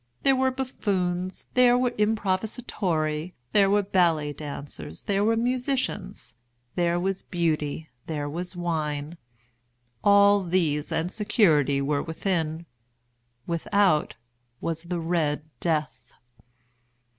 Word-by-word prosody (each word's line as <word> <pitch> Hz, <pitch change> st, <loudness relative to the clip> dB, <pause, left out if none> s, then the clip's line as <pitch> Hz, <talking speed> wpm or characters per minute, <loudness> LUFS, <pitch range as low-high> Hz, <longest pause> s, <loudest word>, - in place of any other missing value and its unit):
There 270 Hz, -1 st, +5 dB
were 260 Hz, 0 st, +2 dB
buffoons, 190 Hz, -9 st, -2 dB
there 245 Hz, -1 st, +5 dB
were 250 Hz, -1 st, +1 dB
improvisatori, 190 Hz, -6 st, -1 dB, 0.2 s
there 200 Hz, -2 st, +5 dB
were 205 Hz, +1 st, +3 dB
ballet 170 Hz, -6 st, +2 dB
dancers, 140 Hz, -, -7 dB
there 200 Hz, 0 st, +1 dB
were 225 Hz, +1 st, +3 dB
musicians, 245 Hz, -5 st, -2 dB, 0.4 s
there 175 Hz, 0 st, +1 dB
was 190 Hz, +1 st, -1 dB
Beauty, 160 Hz, -3 st, -1 dB, 0.2 s
there 150 Hz, -2 st, -3 dB
was 175 Hz, +5 st, -5 dB
wine. 160 Hz, -2 st, -3 dB, 0.8 s
All 200 Hz, 0 st, +6 dB
these 165 Hz, -5 st, 0 dB
and 160 Hz, +2 st, -1 dB
security 155 Hz, -, +3 dB
were 140 Hz, 0 st, 0 dB
within. 165 Hz, -1 st, -2 dB, 0.8 s
Without 170 Hz, 0 st, +1 dB, 0.4 s
was 165 Hz, -1 st, -2 dB
the 175 Hz, 0 st, -2 dB
"Red 160 Hz, -3 st, 0 dB, 0.2 s
Death." 150 Hz, -7 st, -2 dB
175 Hz, 105 wpm, -26 LUFS, 155-205 Hz, 0.8 s, All